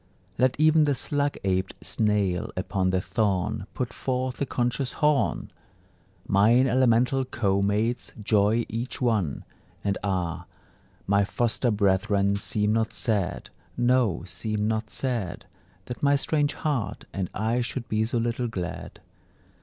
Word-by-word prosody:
Let 130 Hz, 0 st, +3 dB
even 155 Hz, 0 st, +5 dB
the 145 Hz, -2 st, +1 dB
slug 145 Hz, +2 st, -1 dB
abed 95 Hz, -1 st, 0 dB
snail 105 Hz, -5 st, 0 dB
upon 95 Hz, 0 st, 0 dB
the 95 Hz, 0 st, +1 dB
thorn 95 Hz, -2 st, -1 dB
Put 125 Hz, -2 st, -3 dB
forth 130 Hz, 0 st, -2 dB
a 140 Hz, -, 0 dB
conscious 125 Hz, +1 st, -1 dB
horn! 150 Hz, -, +1 dB, 0.8 s
Mine 110 Hz, +6 st, +5 dB
elemental 125 Hz, +1 st, +3 dB
co 100 Hz, -6 st, 0 dB
mates, 110 Hz, +5 st, 0 dB
joy 105 Hz, +2 st, +3 dB
each 115 Hz, +3 st, -4 dB
one; 110 Hz, -, 0 dB, 0.4 s
And 100 Hz, -1 st, -1 dB
ah, 90 Hz, -4 st, -2 dB, 0.6 s
my 100 Hz, +1 st, +3 dB
foster 120 Hz, +4 st, 0 dB
brethren, 100 Hz, -1 st, +2 dB
seem 105 Hz, +1 st, +1 dB
not 110 Hz, 0 st, 0 dB
sad 105 Hz, -7 st, -2 dB, 0.3 s
No, 120 Hz, -7 st, +2 dB
seem 105 Hz, +4 st, -2 dB
not 110 Hz, 0 st, -1 dB
sad, 115 Hz, -10 st, -2 dB, 0.4 s
That 125 Hz, -, -7 dB
my 145 Hz, 0 st, +4 dB
strange 145 Hz, 0 st, +1 dB
heart 145 Hz, -8 st, -2 dB
and 95 Hz, -3 st, -2 dB
I 115 Hz, +4 st, 0 dB
should 120 Hz, 0 st, -3 dB
be 110 Hz, 0 st, +1 dB
so 120 Hz, +2 st, -1 dB
little 120 Hz, +1 st, -1 dB
glad. 90 Hz, -5 st, -6 dB
110 Hz, 135 wpm, -26 LUFS, 100-125 Hz, 0.8 s, even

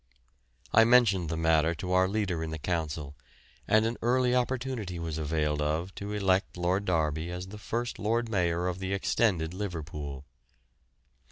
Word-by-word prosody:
I 115 Hz, -, +8 dB
mentioned 110 Hz, -8 st, +4 dB
the 80 Hz, -, -2 dB
matter 80 Hz, 0 st, +3 dB
to 90 Hz, +3 st, -5 dB
our 95 Hz, 0 st, +4 dB
leader 95 Hz, -5 st, -1 dB
in 80 Hz, -, -4 dB
the 80 Hz, -, -4 dB
Council, 75 Hz, -2 st, -3 dB, 0.5 s
and 110 Hz, +1 st, +4 dB
an 115 Hz, +1 st, -1 dB
early 125 Hz, +1 st, +2 dB
opportunity 125 Hz, -6 st, -1 dB
was 80 Hz, -2 st, -4 dB
availed 75 Hz, -1 st, 0 dB
of 80 Hz, +5 st, -1 dB
to 100 Hz, +1 st, -6 dB
elect 95 Hz, -2 st, +1 dB
Lord 90 Hz, +3 st, 0 dB
Derby 80 Hz, -2 st, 0 dB
as 90 Hz, +1 st, -6 dB
the 105 Hz, +1 st, -9 dB
first 120 Hz, +3 st, -3 dB
Lord 115 Hz, +3 st, 0 dB
Mayor 90 Hz, -5 st, 0 dB
of 90 Hz, 0 st, -3 dB
the 95 Hz, 0 st, -2 dB
extended 95 Hz, -5 st, +1 dB
Liverpool. 75 Hz, -7 st, -5 dB
90 Hz, 160 wpm, -29 LUFS, 80-105 Hz, 0.5 s, I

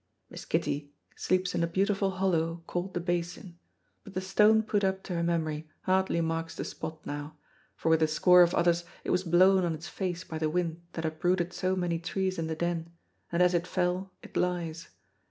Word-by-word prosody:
Miss -, -, -8 dB
Kitty 145 Hz, 0 st, -1 dB, 0.3 s
sleeps 185 Hz, 0 st, 0 dB
in -, -, 0 dB
a 170 Hz, -, +2 dB
beautiful 195 Hz, +3 st, +1 dB
hollow 170 Hz, -3 st, 0 dB
called 180 Hz, +2 st, -4 dB
the -, -, +1 dB
Basin, 175 Hz, 0 st, -3 dB, 0.4 s
but 200 Hz, -2 st, -12 dB
the -, -, +1 dB
stone 210 Hz, +3 st, +4 dB
put 205 Hz, -2 st, 0 dB
up 190 Hz, 0 st, 0 dB
to 180 Hz, -, -5 dB
her 170 Hz, -, 0 dB
memory 160 Hz, -2 st, -1 dB
hardly 190 Hz, -2 st, +1 dB
marks 165 Hz, 0 st, -2 dB
the -, -, -4 dB
spot 160 Hz, -1 st, -7 dB
now, 145 Hz, +1 st, -6 dB, 0.4 s
for 160 Hz, -, -1 dB
with 160 Hz, 0 st, +4 dB
a 155 Hz, -, +5 dB
score 180 Hz, +4 st, +6 dB
of 175 Hz, 0 st, +4 dB
others 170 Hz, 0 st, +3 dB, 0.2 s
it -, -, -2 dB
was 180 Hz, +1 st, +2 dB
blown 185 Hz, +2 st, +5 dB
on 170 Hz, -2 st, 0 dB
its 160 Hz, +2 st, -8 dB
face 180 Hz, -2 st, -3 dB
by 160 Hz, -3 st, -6 dB
the 155 Hz, -1 st, +1 dB
wind 170 Hz, 0 st, -1 dB
that 165 Hz, -, -3 dB
uprooted 175 Hz, +3 st, 0 dB
so 185 Hz, 0 st, 0 dB
many 175 Hz, -2 st, -1 dB
trees 185 Hz, +1 st, -2 dB
in 160 Hz, -, -1 dB
the 160 Hz, -, -2 dB
Den, 170 Hz, 0 st, -2 dB, 0.4 s
and 170 Hz, +1 st, +3 dB
as 180 Hz, 0 st, +4 dB
it 175 Hz, 0 st, 0 dB
fell 180 Hz, +1 st, -1 dB
it -, -, -13 dB
lies. 170 Hz, -2 st, -1 dB
175 Hz, 205 wpm, -29 LUFS, 165-185 Hz, 0.4 s, score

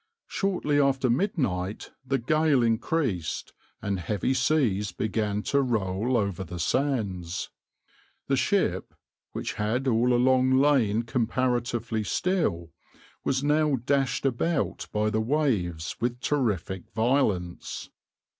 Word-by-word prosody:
Shortly 180 Hz, -7 st, 0 dB
after 135 Hz, -3 st, +2 dB
midnight 120 Hz, -, -1 dB
the 135 Hz, +1 st, 0 dB
gale 150 Hz, +1 st, +2 dB
increased, 115 Hz, -, -1 dB, 0.3 s
and 100 Hz, -2 st, -1 dB
heavy 105 Hz, +8 st, -1 dB
seas 115 Hz, -, +1 dB
began 105 Hz, +1 st, -1 dB
to 140 Hz, -, +2 dB
roll 115 Hz, -1 st, 0 dB
over 100 Hz, -4 st, -1 dB
the 90 Hz, 0 st, -7 dB
sands. 95 Hz, -, -1 dB, 0.7 s
The -, -, +1 dB
ship, -, -, 0 dB, 0.4 s
which -, -, -3 dB
had 115 Hz, +6 st, -1 dB
all 120 Hz, 0 st, +3 dB
along 130 Hz, +1 st, +4 dB
lain 125 Hz, -6 st, +3 dB
comparatively 120 Hz, -2 st, -1 dB
still, 100 Hz, -, -1 dB, 0.5 s
was 135 Hz, 0 st, 0 dB
now 150 Hz, 0 st, +3 dB
dashed 135 Hz, +2 st, 0 dB
about 135 Hz, +4 st, 0 dB
by 105 Hz, 0 st, 0 dB
the 110 Hz, -, +1 dB
waves 110 Hz, -, 0 dB
with 120 Hz, +1 st, -1 dB
terrific 105 Hz, -, -1 dB
violence. 110 Hz, -6 st, -1 dB
120 Hz, 110 wpm, -27 LUFS, 105-135 Hz, 0.7 s, along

